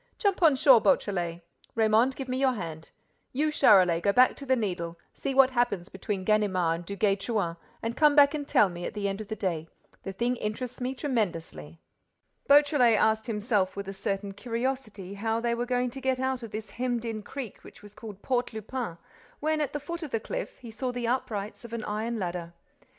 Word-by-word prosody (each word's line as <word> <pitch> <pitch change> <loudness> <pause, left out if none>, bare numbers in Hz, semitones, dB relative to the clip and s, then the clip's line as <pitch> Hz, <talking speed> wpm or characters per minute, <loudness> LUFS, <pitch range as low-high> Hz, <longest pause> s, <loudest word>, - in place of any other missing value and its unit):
"Jump 400 -5 +1
on 315 -5 +6
shore, 260 -3 +6
Beautrelet—Raymonde, 205 +6 +1
give 270 - -6
me 255 0 -2
your 265 -1 +3
hand. 160 -7 -6 0.4
You, 300 +4 +1
Charolais, 180 - +5
go 200 - +3
back 250 +5 +5
to 280 - -9
the 260 - +4
Needle, 175 -7 -3 0.2
see 270 -1 -3
what 265 -1 +6
happens 240 -7 0
between 190 0 -4
Ganimard 190 -6 +2
and 170 +1 -8
Duguay 200 0 +1
Trouin 195 -6 -1 0.3
and 230 +1 -2
come 300 +1 +5
back 285 0 +7
and 290 -2 -4
tell 210 - +5
me 175 -1 -7
at - - -5
the 205 -1 -1
end 195 +2 -3
of 215 - -8
the 220 - -4
day. 170 -6 -2 0.3
The 195 - -5
thing 240 +5 -1
interests 235 +4 -4
me 255 +2 -2
tremendously." 165 - -3 0.7
Beautrelet 285 -5 +6
asked 220 0 +2
himself 210 -3 0
with 200 -1 -5
a 195 - -4
certain 195 0 -3
curiosity 230 -3 -4
how 225 +3 -1
they 235 0 0
were 240 +1 -2
going 250 0 0
to 270 - -8
get 260 -1 0
out 260 -1 -1
of 230 - -7
this 215 -1 -6
hemmed 245 -1 -2
in 225 -2 -3
creek 245 +1 -8
which - - -14
was 205 0 -13
called 210 -3 -10
Port 250 -2 0
Lupin, 220 -4 -5 0.4
when, 310 +1 0
at 295 - -1
the 295 - -3
foot 340 +4 -6
of 310 - -5
the 225 - -1
cliff, - - -5
he 235 -3 -10
saw 250 +4 -3
the 245 -1 -3
uprights 220 -4 -2
of 235 -1 -10
an 230 -2 -3
iron 220 +3 -2
ladder. 175 -3 -4
225 Hz, 205 wpm, -28 LUFS, 195-255 Hz, 0.7 s, back